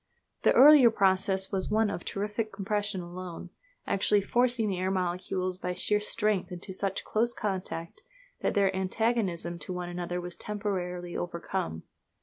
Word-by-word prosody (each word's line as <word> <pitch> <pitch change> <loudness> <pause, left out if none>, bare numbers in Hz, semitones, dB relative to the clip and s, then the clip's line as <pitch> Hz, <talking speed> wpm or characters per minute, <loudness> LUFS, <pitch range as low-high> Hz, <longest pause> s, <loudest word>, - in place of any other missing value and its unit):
The - - +4
earlier 280 -3 +9
process 190 -2 +2
was 190 -2 +1
one 215 0 +2
of 175 - -5
terrific 210 +2 -3
compression 205 -1 -1
alone, 175 0 -8 0.3
actually 200 +1 +2
forcing 240 +1 +1
the 190 -3 -2
air 185 +1 0
molecules 185 0 -2
by 180 - -3
sheer 210 +3 +2
strength 210 -2 0
into 180 +2 -6
such 195 0 -2
close 235 +2 +1
contact 185 -4 -4 0.4
that - - 0
their 195 -2 +3
antagonism 190 -3 -1
to 185 - -5
one 180 -1 -4
another 175 0 -3
was 175 0 -5
temporarily 180 -4 -4
overcome. 170 - -3
190 Hz, 145 wpm, -29 LUFS, 180-210 Hz, 0.4 s, earlier